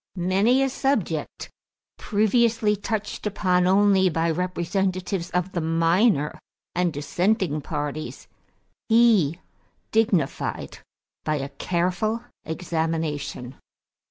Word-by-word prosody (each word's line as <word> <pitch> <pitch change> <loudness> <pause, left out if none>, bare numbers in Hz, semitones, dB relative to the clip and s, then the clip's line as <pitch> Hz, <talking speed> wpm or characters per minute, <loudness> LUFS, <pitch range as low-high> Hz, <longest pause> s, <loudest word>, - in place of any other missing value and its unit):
Many 195 +9 +2
a 270 - +1
subject 225 - -2 0.5
previously 220 0 +2
touched 210 +1 -3
upon 180 -3 +1
only 195 -1 +4
by 165 0 0
representatives 180 +1 -2
of 180 +1 -1
the 170 - -2
minor 165 +1 +2 0.3
and 180 -1 +1
dissenting 175 +2 0
parties, 145 +2 -5 0.6
he 220 -9 +4 0.5
dignified 210 - 0 0.4
by 155 - 0
a 140 -1 -3
careful 180 +9 -1 0.2
examination. 160 -6 -3
180 Hz, 90 wpm, -24 LUFS, 160-210 Hz, 0.6 s, only